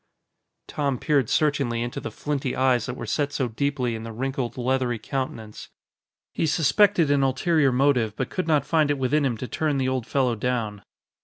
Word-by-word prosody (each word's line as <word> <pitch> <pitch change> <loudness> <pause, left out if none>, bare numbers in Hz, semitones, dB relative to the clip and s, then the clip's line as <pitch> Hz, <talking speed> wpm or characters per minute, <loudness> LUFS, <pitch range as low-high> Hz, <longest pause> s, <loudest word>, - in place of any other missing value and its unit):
Tom 140 -3 -1
peered 140 -3 +1
searchingly 140 -6 +1
into 120 - -4
the - - -5
flinty 140 -3 -3
eyes 130 -3 +2
that 125 - -4
were - - -6
set 145 -2 -1
so 130 -3 -1
deeply 125 0 -1
in 110 - -5
the 115 0 -7
wrinkled, 130 +1 -3
leathery 125 -1 0
countenance. 110 -2 -5 0.6
He 160 - 0
suspected 165 +1 +3
an 140 -1 +3
ulterior 135 +2 +2
motive, 125 -5 +2
but 130 - -3
could 185 -3 -2
not 150 -3 +2
find 155 -3 +2
it 145 - +1
within 135 +3 +1
him 120 -4 -1
to 125 - -5
turn 150 0 -1
the 130 -1 0
old 130 -3 -2
fellow 130 -3 +1
down. 110 -3 -2
130 Hz, 185 wpm, -24 LUFS, 120-145 Hz, 0.6 s, suspected